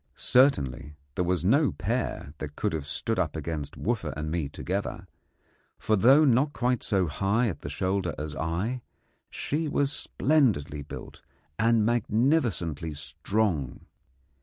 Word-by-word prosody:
Certainly 75 Hz, -, +2 dB, 0.2 s
there 90 Hz, -, 0 dB
was 90 Hz, -1 st, 0 dB
no 140 Hz, +8 st, +4 dB
pair 70 Hz, -, -3 dB
that 75 Hz, -1 st, -6 dB
could -, -, -1 dB
have 75 Hz, -3 st, -3 dB
stood 110 Hz, +9 st, -1 dB
up 80 Hz, -4 st, 0 dB
against 80 Hz, -2 st, -4 dB
Wooffa 105 Hz, -9 st, -1 dB
and 75 Hz, 0 st, -3 dB
me 80 Hz, -4 st, -1 dB
together; -, -, -4 dB, 0.7 s
for 110 Hz, -, +1 dB
though 135 Hz, +9 st, +6 dB
not 140 Hz, +3 st, +3 dB
quite 125 Hz, 0 st, 0 dB
so 95 Hz, -3 st, +1 dB
high 100 Hz, +9 st, +1 dB
at 90 Hz, -, -5 dB
the 75 Hz, -, -5 dB
shoulder 95 Hz, +3 st, -1 dB
as 75 Hz, -1 st, -5 dB
I, 85 Hz, -, -2 dB, 0.5 s
she 155 Hz, +2 st, -2 dB
was 140 Hz, -1 st, +1 dB
splendidly 110 Hz, -, +1 dB
built 70 Hz, -, -9 dB, 0.4 s
and 115 Hz, -1 st, +4 dB
magnificently 110 Hz, -, +1 dB
strong. 75 Hz, -, -1 dB
95 Hz, 135 wpm, -27 LUFS, 75-120 Hz, 0.7 s, though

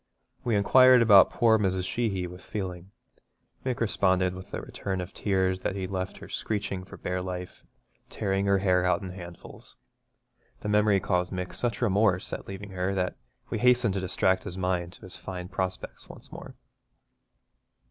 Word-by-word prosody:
We 120 Hz, -3 st, +1 dB
inquired 130 Hz, +4 st, +6 dB
about 100 Hz, -4 st, +8 dB
poor 110 Hz, -2 st, +3 dB
Mrs. 95 Hz, -2 st, 0 dB
Sheeny 100 Hz, -6 st, -1 dB
with 90 Hz, +1 st, -9 dB
feeling. 95 Hz, -3 st, -5 dB, 0.7 s
Mick 130 Hz, -2 st, -2 dB
responded 95 Hz, -5 st, +2 dB
with 95 Hz, 0 st, -10 dB
a -, -, -3 dB
return 95 Hz, -2 st, -4 dB
of 90 Hz, +1 st, -6 dB
tears 95 Hz, -2 st, 0 dB
that 95 Hz, -, -2 dB
he'd 95 Hz, -1 st, -4 dB
left 95 Hz, 0 st, -3 dB
her -, -, -10 dB
screeching 100 Hz, -3 st, -3 dB
for -, -, -11 dB
bare 90 Hz, 0 st, -3 dB
life 90 Hz, 0 st, -6 dB, 0.3 s
and -, -, -40 dB
tearing 100 Hz, -1 st, -1 dB
her 100 Hz, 0 st, +4 dB
hair 90 Hz, -2 st, +2 dB
out 90 Hz, +2 st, +1 dB
in 95 Hz, -, -5 dB
handfuls. 85 Hz, -2 st, -11 dB, 0.8 s
The 105 Hz, -, -3 dB
memory 105 Hz, -1 st, +4 dB
caused 90 Hz, -1 st, 0 dB
Mick 90 Hz, -1 st, -4 dB
such 120 Hz, 0 st, -2 dB
remorse 100 Hz, -3 st, +2 dB
at -, -, -5 dB
leaving 100 Hz, +1 st, -7 dB
her 95 Hz, +1 st, -1 dB
that 90 Hz, -1 st, -1 dB, 0.4 s
we -, -, -1 dB
hastened 125 Hz, -4 st, +4 dB
to 95 Hz, -, -1 dB
distract 95 Hz, 0 st, +1 dB
his 90 Hz, -, -7 dB
mind 90 Hz, -1 st, -1 dB
to -, -, -16 dB
his 95 Hz, -, -9 dB
fine 90 Hz, -1 st, -7 dB
prospects 95 Hz, -1 st, -4 dB
once -, -, -12 dB
more. -, -, -10 dB
95 Hz, 175 wpm, -28 LUFS, 90-105 Hz, 0.8 s, about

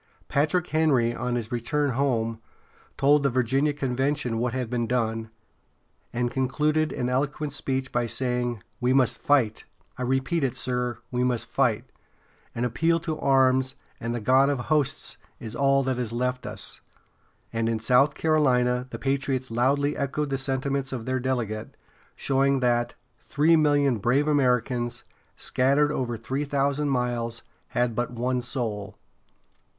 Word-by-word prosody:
Patrick 155 Hz, +5 st, +1 dB
Henry, 140 Hz, -8 st, +2 dB
on 125 Hz, -1 st, -2 dB
his 120 Hz, -1 st, -4 dB
return 135 Hz, +4 st, 0 dB
home, 115 Hz, -4 st, 0 dB, 0.6 s
told 145 Hz, +2 st, +4 dB
the 140 Hz, -, +2 dB
Virginia 130 Hz, +4 st, +1 dB
convention 135 Hz, -2 st, -1 dB
what 120 Hz, +1 st, 0 dB
had 130 Hz, -1 st, -2 dB
been 120 Hz, 0 st, -1 dB
done, 115 Hz, -2 st, -1 dB, 0.8 s
and 120 Hz, 0 st, -1 dB
concluded 150 Hz, +4 st, +1 dB
an 125 Hz, -, -2 dB
eloquent 145 Hz, +3 st, -1 dB
speech 130 Hz, -2 st, -2 dB
by 120 Hz, -1 st, 0 dB
saying: 125 Hz, -2 st, -1 dB, 0.2 s
"We 125 Hz, 0 st, +2 dB
must 130 Hz, -3 st, +3 dB
fight! 125 Hz, -7 st, +2 dB, 0.4 s
I -, -, -3 dB
repeat 135 Hz, +6 st, 0 dB
it, 130 Hz, -3 st, -1 dB
sir, 125 Hz, -1 st, -1 dB
we 125 Hz, 0 st, 0 dB
must 125 Hz, -2 st, +1 dB
fight! -, -, +1 dB, 0.7 s
An 120 Hz, -, -1 dB
appeal 165 Hz, +8 st, +1 dB
to 160 Hz, -2 st, -3 dB
arms 130 Hz, -1 st, +3 dB, 0.2 s
and 115 Hz, +1 st, -3 dB
the -, -, -2 dB
God 130 Hz, +5 st, +4 dB
of 145 Hz, -, +1 dB
hosts 150 Hz, -4 st, 0 dB, 0.2 s
is 115 Hz, 0 st, -7 dB
all 135 Hz, 0 st, +3 dB
that 130 Hz, -1 st, -1 dB
is 120 Hz, -3 st, -2 dB
left 125 Hz, +2 st, -2 dB
us." -, -, -5 dB, 0.7 s
And 115 Hz, 0 st, 0 dB
in 115 Hz, -, 0 dB
South 135 Hz, +5 st, +3 dB
Carolina 125 Hz, -5 st, +2 dB
the 115 Hz, -, -6 dB
patriots 135 Hz, 0 st, -1 dB
loudly 140 Hz, +5 st, +1 dB
echoed 140 Hz, +1 st, -2 dB
the 135 Hz, -, 0 dB
sentiments 135 Hz, 0 st, -1 dB
of 120 Hz, -4 st, -4 dB
their 130 Hz, 0 st, 0 dB
delegate, 120 Hz, -4 st, -3 dB, 0.4 s
showing 135 Hz, 0 st, +2 dB
that 120 Hz, -1 st, +1 dB, 0.2 s
"three 155 Hz, +3 st, +3 dB
million 145 Hz, -5 st, +3 dB
brave 125 Hz, +7 st, +2 dB
Americans, 125 Hz, -4 st, +1 dB, 0.3 s
scattered 140 Hz, +3 st, +2 dB
over 120 Hz, -5 st, -2 dB
three 135 Hz, +6 st, -3 dB
thousand 140 Hz, 0 st, 0 dB
miles, 120 Hz, -3 st, -1 dB, 0.2 s
had 120 Hz, -1 st, 0 dB
but 120 Hz, +2 st, -1 dB
one 125 Hz, +1 st, -1 dB
soul." 110 Hz, -5 st, -2 dB
130 Hz, 150 wpm, -26 LUFS, 120-140 Hz, 0.8 s, told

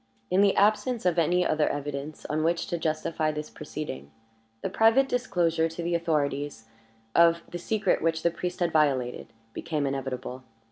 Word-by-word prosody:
In 185 Hz, -, +4 dB
the 200 Hz, -1 st, +4 dB
absence 215 Hz, +2 st, +2 dB
of 175 Hz, -1 st, +3 dB
any 175 Hz, +2 st, +2 dB
other 155 Hz, -1 st, +2 dB
evidence 145 Hz, +1 st, -5 dB
on 155 Hz, +1 st, -1 dB
which 170 Hz, +1 st, +1 dB
to 170 Hz, -, -1 dB
justify 155 Hz, 0 st, -1 dB
this 150 Hz, 0 st, -6 dB
proceeding, 70 Hz, -, -7 dB, 0.5 s
the -, -, -1 dB
private 225 Hz, +5 st, +4 dB
disclosure 170 Hz, -10 st, +1 dB
to 165 Hz, +1 st, -6 dB
the 170 Hz, +1 st, -1 dB
authorities 145 Hz, -6 st, -1 dB, 0.5 s
of 170 Hz, 0 st, +5 dB
the 175 Hz, -, -4 dB
secret 215 Hz, +4 st, 0 dB
which 160 Hz, 0 st, 0 dB
the 170 Hz, -, +3 dB
priest 180 Hz, +2 st, -5 dB
had 170 Hz, -1 st, +2 dB
violated 135 Hz, -6 st, +1 dB, 0.3 s
became 150 Hz, -3 st, -2 dB
inevitable. 130 Hz, -1 st, -4 dB
160 Hz, 160 wpm, -27 LUFS, 145-175 Hz, 0.5 s, of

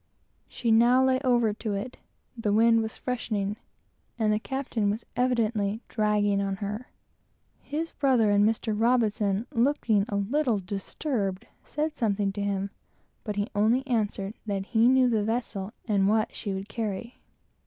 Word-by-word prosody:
She 235 Hz, -2 st, -2 dB
now 240 Hz, +3 st, +5 dB
lay 260 Hz, 0 st, +3 dB
over 240 Hz, -5 st, +2 dB
to 215 Hz, -1 st, -3 dB
it, 245 Hz, +6 st, -5 dB, 0.4 s
the 225 Hz, -3 st, -1 dB
wind 230 Hz, +2 st, +5 dB
was 220 Hz, 0 st, -5 dB
freshening, 215 Hz, -5 st, -2 dB, 0.6 s
and 215 Hz, -2 st, +2 dB
the 210 Hz, -, +1 dB
captain 250 Hz, -4 st, -2 dB
was 215 Hz, +3 st, -3 dB
evidently 225 Hz, -4 st, 0 dB
"dragging 210 Hz, -2 st, +1 dB
on 195 Hz, -1 st, -1 dB
to 190 Hz, -, -17 dB
her." 210 Hz, +4 st, -4 dB, 0.7 s
His 320 Hz, +3 st, -4 dB
brother 255 Hz, -7 st, +2 dB
and 205 Hz, 0 st, +4 dB
Mr. 220 Hz, +1 st, +1 dB
R, 215 Hz, -2 st, +1 dB
looking 235 Hz, -5 st, +2 dB
a 205 Hz, -, -2 dB
little 235 Hz, +3 st, +1 dB, 0.2 s
squally, 200 Hz, -4 st, -2 dB, 0.3 s
said 305 Hz, +1 st, -3 dB
something 205 Hz, -6 st, 0 dB
to 205 Hz, +1 st, -5 dB
him, 200 Hz, -1 st, -1 dB, 0.5 s
but 210 Hz, -2 st, -4 dB
he 205 Hz, +2 st, -2 dB
only 225 Hz, +6 st, +2 dB
answered 210 Hz, -5 st, -1 dB
that 195 Hz, -2 st, -2 dB
he 225 Hz, +2 st, +3 dB
knew 260 Hz, -1 st, +5 dB
the 220 Hz, -3 st, +1 dB
vessel 215 Hz, -3 st, -2 dB, 0.2 s
and 200 Hz, -3 st, +2 dB
what 215 Hz, +1 st, +1 dB
she 205 Hz, -, -4 dB
would 190 Hz, +1 st, -5 dB
carry. 220 Hz, +1 st, -5 dB
220 Hz, 155 wpm, -27 LUFS, 205-245 Hz, 0.7 s, now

